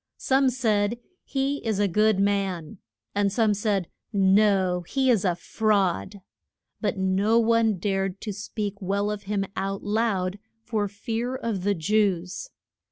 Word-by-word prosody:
Some 265 0 +3
said, 225 -3 +1 0.3
He 275 +1 -2
is 220 -3 0
a 205 0 +2
good 210 +2 +3
man; 195 -3 -1 0.3
and 200 -1 +1
some 220 0 +2
said, 200 -3 0 0.2
No, 195 -2 +3
he 260 +9 +1
is 220 -6 +2
a 180 -3 +1
fraud. 200 0 0 0.6
But - - -1
no 190 +4 +2
one 230 -2 +3
dared 195 0 -1
to 210 - -4
speak 205 0 -4
well 200 +2 0
of 205 -1 -6
him 200 -2 0
out 195 +1 -3
loud 205 -3 0 0.2
for 215 -3 -1
fear 230 +5 -3
of 230 -7 -3
the 205 +1 +2
Jews. 190 - 0
205 Hz, 145 wpm, -25 LUFS, 195-220 Hz, 0.6 s, Some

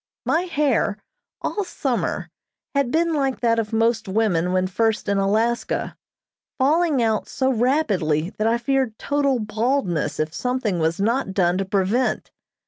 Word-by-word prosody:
My 335 +3 +1
hair, 280 - +1 0.5
all 415 - -1
summer, - - -2 0.5
had 280 -3 +1
been 330 +4 +1
like 270 -3 0
that 230 -1 +2
of 215 -1 -3
most 225 -1 +1
women 190 -4 +1
when 185 0 +1
first 220 +4 0
in 200 -1 +1
Alaska, 220 +5 0 0.6
falling 295 -1 +2
out 220 -1 0
so 265 -1 0
rapidly 200 - +1
that 215 - +2
I 230 +1 +2
feared 250 -2 0
total 285 -2 +1
baldness 215 - -1
if 155 +1 -1
something 250 -5 -1
was 160 +2 0
not 220 -1 0
done 180 -1 +2
to 195 - -1
prevent. 200 +6 0
225 Hz, 145 wpm, -22 LUFS, 195-265 Hz, 0.6 s, that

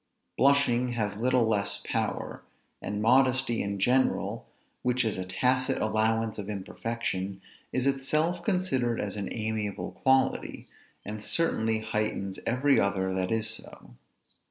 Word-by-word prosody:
Blushing 125 -3 +3
has 105 -4 -1
little 125 +1 +2
less 100 -2 0
power; - - -2 0.4
and 105 +2 -3
modesty 130 0 +3
in 100 0 -2
general, 125 +6 +1 0.3
which 125 0 +1
is 110 -4 -1
a 95 - -3
tacit 130 +7 +1
allowance 110 +1 +1
of 100 0 -5
imperfection, 100 -1 -3 0.3
is 130 0 0
itself 155 +6 +1
considered 135 - +1
as 100 0 -2
an 100 -1 -4
amiable 110 -2 -3
quality, 130 0 +1 0.4
and 105 +1 -5
certainly 110 -5 0
heightens 105 -3 -2
every 135 +4 +3
other 95 -1 0
that 95 -1 -1
is 110 -1 +1
so. 110 +1 -8
115 Hz, 130 wpm, -28 LUFS, 105-130 Hz, 0.4 s, Blushing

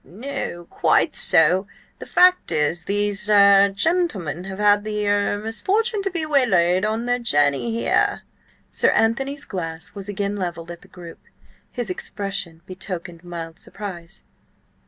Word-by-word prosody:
"No–quite 210 -5 -1
so— 180 +5 +4 0.3
The - - -9
fact 365 0 +4
is, 155 +3 -1
these–er–gentlemen 200 - +2
have 190 0 -7
had 205 0 +3
the–er–misfortune 215 - 0
to 390 - -2
be 335 -4 -3
waylaid 190 - +2
on 220 +2 -1
their 245 0 0
journey 145 - +1
here." 230 +1 0 0.5
Sir - - +2
Anthony's 270 +6 0
glass 170 -1 -6
was 200 +1 -8
again 205 0 -2
levelled 175 -3 -5
at 170 - -10
the - - -18
group. 175 -2 -12 0.5
His 240 -6 -3
expression 185 -4 -5
betokened 180 -2 -7
mild 170 -1 -8
surprise. 195 -3 -9
200 Hz, 120 wpm, -22 LUFS, 175-225 Hz, 0.5 s, so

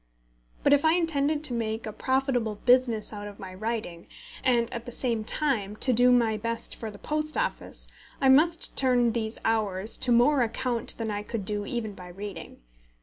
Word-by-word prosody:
But - - +5
if 285 - +4
I 315 0 +5
intended 310 -3 0
to 280 -5 +4
make 225 -1 -2
a 215 - -5
profitable 260 -4 0
business 240 -2 +2
out 205 0 -6
of 205 -1 -10
my 185 -1 -9
writing, 215 -4 -4 0.4
and, 240 -2 +3
at 235 0 -6
the - - -5
same 235 -3 -1
time, 215 -6 0
to 255 +4 +2
do 245 +2 +5
my 230 -3 +3
best 230 +2 -4
for 225 - -6
the 205 - -10
Post 305 +5 -3
Office, - - -2 0.3
I 270 - +2
must 315 +5 +4
turn 245 -3 +3
these 220 -1 -3
hours 215 -2 0
to 250 - +2
more 250 +4 +4
account 240 +1 -1
than 225 -2 -3
I 205 0 -3
could 210 -1 -5
do 205 0 -2
even 220 -4 -3
by 180 -2 -11
reading. 185 - -9
230 Hz, 190 wpm, -27 LUFS, 215-260 Hz, 0.4 s, But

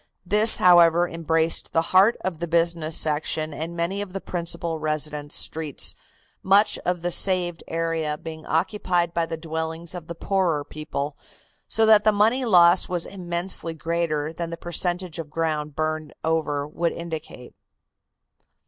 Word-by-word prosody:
This, 210 +4 +6
however, 175 -1 +5
embraced 165 0 -1
the 165 - +2
heart 195 +5 +5
of 175 -4 -4
the 170 - -3
business 165 -1 +1
section 155 0 -1
and 165 +3 -6
many 180 +4 -2
of 195 -3 -7
the 195 - -3
principal 170 -2 -2
residence 150 -1 -2
streets, 155 -3 +1 0.5
much 200 +3 +3
of 175 -1 -1
the 175 - -1
saved 180 -2 +1
area 165 -2 -2
being 160 0 -9
occupied 175 0 0
by 170 -1 0
the 165 0 -5
dwellings 160 +1 -5
of 175 -3 -8
the 170 - -6
poorer 175 -5 0
people, 150 -1 -5 0.5
so 225 - +2
that 215 -1 +6
the 215 - +5
money 225 +5 +2
loss 175 -4 +5
was 175 -2 0
immensely 175 -2 -3
greater 160 -1 -2
than 170 0 -5
the 170 - -6
percentage 175 0 -2
of 160 -2 -6
ground 150 -2 -2
burned 155 -1 -3
over 150 -3 -1
would 165 +2 -2
indicate. 160 -7 -8
165 Hz, 150 wpm, -24 LUFS, 155-180 Hz, 0.5 s, This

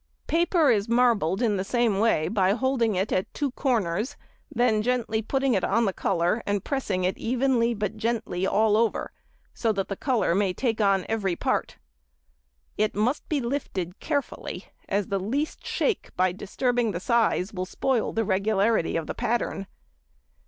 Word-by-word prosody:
Paper 335 -3 +3
is 210 -1 +1
marbled 235 -5 +2
in 210 -4 +2
the 185 - -1
same 230 -2 +1
way 210 -8 +2
by 195 -3 +2
holding 240 -3 +1
it 190 +3 -1
at 185 - 0
two 285 -3 -1
corners; 225 - -1 0.3
then 240 -6 +2
gently 230 -2 0
putting 265 +3 0
it 190 - +1
on 230 +3 +2
the 195 - 0
colour 180 +5 0
and 200 -1 0
pressing 210 -10 -1
it 185 +1 -1
evenly, 240 -1 +1
but 210 +1 -3
gently 215 -5 -2
all 210 +1 +3
over, 230 -1 0 0.4
so 225 - 0
that 195 -2 -2
the 195 - -2
colour 245 -7 +1
may 195 0 +1
take 225 +2 -1
on 195 -2 +3
every 200 -5 -1
part. - - -1 1.0
It 215 0 +1
must 230 +7 0
be 300 - +1
lifted 215 - -3
carefully, 285 -4 -3 0.2
as 200 -1 0
the 195 -1 0
least 270 +11 -3
shake 450 - -1
by 185 0 +3
disturbing 235 +4 -1
the 170 - -3
size 225 -2 +1
will 185 -1 -3
spoil 250 +3 0
the 225 0 -1
regularity 200 -1 +1
of 165 - -3
the - - -4
pattern. 220 -4 -2
220 Hz, 165 wpm, -26 LUFS, 195-245 Hz, 1.0 s, Paper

